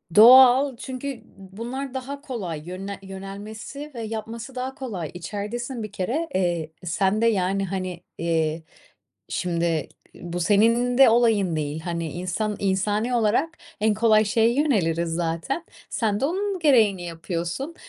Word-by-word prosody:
Doğal, 255 +3 +8
çünkü 260 0 -6
bu 195 -2 -16
bunlar 260 +4 -5
daha 275 +2 -5
kolay 195 - -5
yönle 190 +3 -6
yönelmesi 205 +9 -8
ve 235 - -5
yapması 225 +3 -6
daha 260 +1 -4
kolay. 195 - -5
İçeridesin 215 +7 -5
bir 215 - -6
kere. 245 - -2
Eee, 175 -4 0
sen 190 +4 +1
de, - - +3
yani, 195 -2 +1
hani, 185 -2 -4
iii, 160 -1 0 0.7
şimdi 170 -3 -1 0.2
i 175 0 -9
bu 175 - -1
senin 230 +6 +3
de 270 -2 +8
olayın 225 -7 +3
değil. 150 0 -2
Hani, 170 -2 -3
insan 185 +4 -2
insani 205 +5 0
olarak 240 +10 +1 0.2
en 215 0 +3
kolay 215 0 +4
şeye 225 +2 +3
yöneliriz, 180 - +1
zaten. 170 - -2 0.2
Sen 210 -3 0
de 270 - +1
onun 385 +4 -1
gereğini 225 - +4
yapıyorsun. 170 - -4
210 Hz, 140 wpm, -24 LUFS, 180-245 Hz, 0.7 s, Doğal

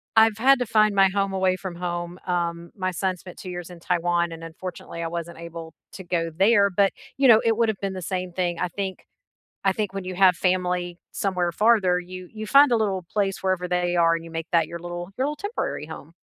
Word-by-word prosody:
I've 220 -1 +5
had 270 +3 +6
to 245 - 0
find 215 -2 +3
my 195 -1 +6
home 195 0 0
away 185 -1 +2
from 185 -1 -6
home. 175 0 -4
Um, 170 -1 -2
my 185 -2 -1
son 185 +1 -1
spent 180 0 -12
2 185 - -8
years 175 -1 -6
in 175 -1 -11
Taiwan 175 0 0
and 165 0 -8
unfortunately, 170 0 -7
I - - -1
wasn't 170 0 -5
able 165 -1 -8 0.2
to 190 - -8
go 165 -2 -1
there, 200 +2 +4
but, 195 +1 +3 0.3
you 270 -1 +4
know, 225 -2 +8
it 225 -1 +3
would’ve 220 -3 +1
been 195 -1 -1
the 185 - -6
same 180 -1 -3
thing, 175 -2 -1
I 180 - -1
think 190 +1 -5 0.6
I 195 - +4
think 205 0 -2
when 195 -1 -4
you 185 0 -5
have 185 -2 +5
family 180 -1 0
somewhere 180 -3 -1
farther, 205 -4 +3
you 180 0 -9
you 215 -1 -6
find 280 +1 +6
a - - +5
little 190 -4 -1
place 195 -2 0
wherever 185 -1 0
they 180 0 0
are 165 -1 +4
and 165 0 -4
you 165 - -10
make 165 0 -5
that 165 -2 +4
your 170 - -5
little 175 +1 -6
your 260 - 0
little 295 +1 -3
temporary 410 - -3
home. 160 +3 -13
180 Hz, 235 wpm, -24 LUFS, 175-195 Hz, 0.6 s, know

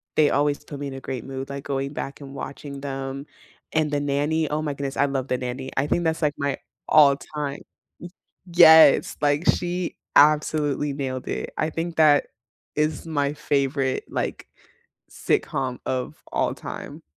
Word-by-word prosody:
they 150 -2 +5
always 145 0 +1
put 145 -1 -8
me 145 - -4
in 135 - -6
a 135 - -7
great 130 -4 -5
mood, 135 0 -6
like, 140 0 -6
going 140 0 -2
back 145 0 -6
and 135 -1 -9
watching 140 0 -7
them, 135 0 -5 0.5
and 155 -1 +1
The 145 - +1
Nanny, 145 +2 0
oh 150 +1 -1
my 150 -2 -2
goodness, 140 -1 -5
I 140 - +4
love 135 -1 -2
The 125 - 0
Nanny. 130 +1 -5
I 140 - +2
think 175 +3 +1
that's 160 +1 0
like 150 -1 +2
my 140 0 -1 0.3
all 145 -2 +7
time. 145 0 -5 0.4
Y 175 - -8 0.5
Yes, 160 -4 +8
like 145 +1 +2
she 175 0 0 0.2
absolutely 150 -1 +3
nailed 130 -2 -4
it, - - -4
I 155 - 0
think 165 +1 -4
that 150 -2 +5 0.5
is 155 +2 0
my 145 -2 0
favorite, 140 -2 0
like, - - -3 0.6
sitcom 130 -2 -1
of 130 -1 -2 0.2
all - - 0
time. - - -8
145 Hz, 170 wpm, -24 LUFS, 135-150 Hz, 0.6 s, Yes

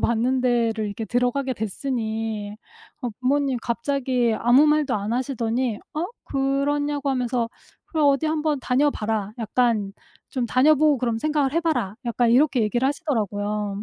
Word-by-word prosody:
받는 240 +3 +1
데를 230 -3 +1
이렇게 220 +2 -5
들어가게 250 +3 0
됐으니 220 -2 -3 0.5
어 245 - -1
부모님이 270 0 +1
갑자기 250 0 0
아무 250 +6 +5
말도 300 -3 +2
안 210 +2 -2
하시더니 245 -2 -1 0.2
어 315 +3 -1 0.2
그러냐고 280 +1 0
하면서 245 -2 0 0.4
"그래 320 - -3
어디 285 +1 +3
한번 310 -2 0
다녀 270 +4 +2
봐라. 210 -4 -2
약간 225 -3 0 0.4
좀 250 -3 -2
다녀보고 295 +3 +4
그러면 235 -2 -1
생각을 295 -1 0
해 330 - +2
봐라." 245 - -1
약간 235 0 +2
이렇게 255 -1 +4
얘기를 240 +5 +1
하시더라고요. 210 - -2
250 Hz, 345 characters per minute, -23 LUFS, 225-280 Hz, 0.5 s, 아무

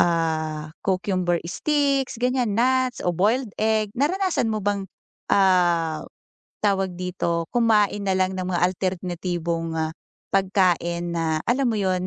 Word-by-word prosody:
ah, 160 -2 0
cucumber 185 -2 0
sticks, 275 - 0
ganiyan 250 -3 +1
nuts 255 +1 +2
o 175 - +2
boiled 215 +7 +1
egg, 215 -1 +1
naranasan 360 - +1
mo 215 -2 -2
bang, 200 -1 0 0.5
ah, 175 -5 +3 0.6
tawag 195 -3 +1
dito, 175 -2 -2
kumain 210 -4 +2
na 190 - +2
lang 185 0 +1
ng 185 - -2
mga 180 -2 -1
alternatibong 175 -2 -2 0.6
pagkain 175 -3 +1
na 160 -1 0
alam 255 +2 +1
mo 225 - 0
'yun, 185 -2 0
185 Hz, 125 wpm, -24 LUFS, 175-220 Hz, 0.6 s, ah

